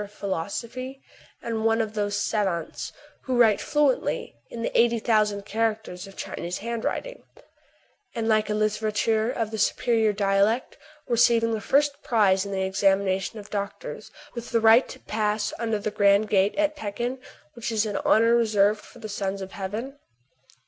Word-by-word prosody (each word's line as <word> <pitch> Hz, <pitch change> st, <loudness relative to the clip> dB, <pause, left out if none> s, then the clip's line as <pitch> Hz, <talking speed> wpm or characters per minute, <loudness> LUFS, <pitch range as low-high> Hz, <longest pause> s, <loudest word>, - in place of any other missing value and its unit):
of 200 Hz, -, -10 dB
philosophy, 225 Hz, +8 st, -4 dB, 0.4 s
and 225 Hz, -1 st, -2 dB
one 225 Hz, 0 st, +3 dB
of 220 Hz, -1 st, -1 dB
those 205 Hz, -1 st, -1 dB
savants 195 Hz, -6 st, -2 dB, 0.3 s
who 255 Hz, -2 st, 0 dB
write 220 Hz, -4 st, +5 dB
fluently 295 Hz, -, 0 dB, 0.2 s
in 230 Hz, -1 st, -6 dB
the -, -, -3 dB
eighty 235 Hz, 0 st, +4 dB
thousand 215 Hz, -3 st, +1 dB
characters 215 Hz, -4 st, -2 dB
of 195 Hz, -, -14 dB
Chinese 175 Hz, +1 st, -4 dB
handwriting, 235 Hz, -, -4 dB, 0.9 s
and 225 Hz, -1 st, -2 dB
like 215 Hz, -1 st, +2 dB
a -, -, +1 dB
littérateur 215 Hz, +1 st, +1 dB
of 225 Hz, -3 st, -3 dB
the 220 Hz, -, -4 dB
superior 220 Hz, +1 st, +2 dB
dialect 200 Hz, +4 st, +1 dB, 0.3 s
receiving 235 Hz, -1 st, +3 dB
the 220 Hz, -, -2 dB
first 285 Hz, +4 st, +1 dB
prize 200 Hz, -4 st, +2 dB
in -, -, -6 dB
the 190 Hz, -1 st, -1 dB
examination 195 Hz, +1 st, +1 dB
of 210 Hz, -1 st, -10 dB
doctors, 200 Hz, -1 st, -5 dB, 0.2 s
with 235 Hz, -1 st, -7 dB
the 230 Hz, -, +2 dB
right 225 Hz, +3 st, +6 dB
to -, -, -9 dB
pass 210 Hz, 0 st, -1 dB
under 225 Hz, -2 st, 0 dB
the 210 Hz, +1 st, -3 dB
grand 205 Hz, 0 st, +3 dB
gate 195 Hz, 0 st, +2 dB
at 305 Hz, 0 st, +1 dB
Pekin, 240 Hz, +3 st, -4 dB, 0.3 s
which 235 Hz, 0 st, -4 dB
is 220 Hz, -1 st, +1 dB
an 205 Hz, -2 st, -2 dB
honor 230 Hz, +1 st, +4 dB
reserved 210 Hz, -2 st, +3 dB
for -, -, -16 dB
the 215 Hz, -, -7 dB
Sons 200 Hz, -1 st, -3 dB
of 190 Hz, 0 st, -7 dB
Heaven 225 Hz, +9 st, -5 dB
215 Hz, 165 wpm, -25 LUFS, 200-230 Hz, 0.9 s, right